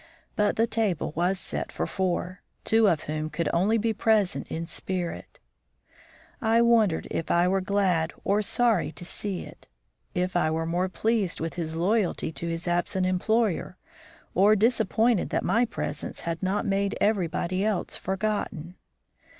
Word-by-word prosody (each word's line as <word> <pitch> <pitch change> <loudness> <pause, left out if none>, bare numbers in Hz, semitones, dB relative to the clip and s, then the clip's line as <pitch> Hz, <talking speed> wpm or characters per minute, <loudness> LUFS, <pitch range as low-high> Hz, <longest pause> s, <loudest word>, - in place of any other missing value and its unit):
But 210 0 +2
the 225 - +3
table 220 -9 -1
was 180 +3 +1
set - - -3
for - - -2
four, 185 -1 -2 0.2
two 225 -1 +4
of 160 -2 0
whom 155 +1 -3
could 155 +1 -2
only 200 +7 +3
be 225 +1 0
present 210 -2 +1
in 165 +1 -4
spirit. 175 - -5 1.0
I 225 +1 +3
wondered 225 -8 +3
if 165 - -3
I 175 +1 +3
were 190 +1 +1
glad 185 -4 +1
or 205 +2 +2
sorry 220 -5 +2
to 175 - -8
see 195 +1 -3
it - - -12 0.5
if 180 +1 -1
I 165 -3 +3
were 160 +1 -1
more 175 +3 0
pleased 215 -3 0
with 165 0 -3
his 160 -2 -4
loyalty 185 0 +1
to 160 +3 -4
his 165 +1 -3
absent 175 +2 0
employer, 200 +2 0 0.6
or 205 +4 +5
disappointed 225 0 +2
that - - -1
my 235 +2 +3
presence 235 - -4
had 165 -1 -3
not 190 +2 0
made 200 0 0
everybody 185 -2 0
else 210 -4 -1
forgotten. 190 -3 -3
185 Hz, 155 wpm, -26 LUFS, 170-215 Hz, 1.0 s, or